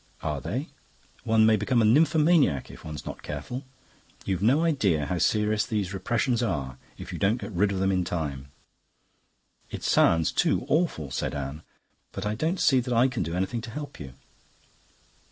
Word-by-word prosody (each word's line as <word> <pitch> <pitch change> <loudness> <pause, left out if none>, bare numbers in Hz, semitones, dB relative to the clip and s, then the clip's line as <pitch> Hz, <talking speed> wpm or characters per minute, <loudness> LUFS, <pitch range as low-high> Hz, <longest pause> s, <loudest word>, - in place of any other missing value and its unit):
"Are - - -2
they?" - - -4 0.6
"One 110 -1 +4
may 110 0 +5
become 120 +5 +1
a 110 - +4
nymphomaniac 155 - +3
if - - -13
one's 75 -2 -7
not - - -7
careful. 75 - -6 0.6
You've 95 -2 -1
no 135 +10 +3
idea 100 - +1
how 85 +5 -2
serious 105 +1 +2
these 105 -5 -2
repressions 120 +4 0
are 70 - -2 0.2
if - - -8
you - - -5
don't 105 +5 +2
get 120 - -7
rid 100 +2 +1
of 100 - -2
them 95 +1 +1
in 90 -1 +1
time." 70 -6 -4 1.2
"It - - -7
sounds 80 -1 +3
too - - +1
awful," 150 - 0
said 65 - -2
Anne. 70 +2 -5 0.5
"But 95 - -5
I 105 - 0
don't 160 - -1
see 135 -3 +4
that 125 0 -2
I 125 +3 +4
can 125 -3 -3
do 85 0 -3
anything 95 +6 -2
to 115 - -8
help 145 +4 -7
you." 65 -3 -9
105 Hz, 180 wpm, -26 LUFS, 85-125 Hz, 1.2 s, may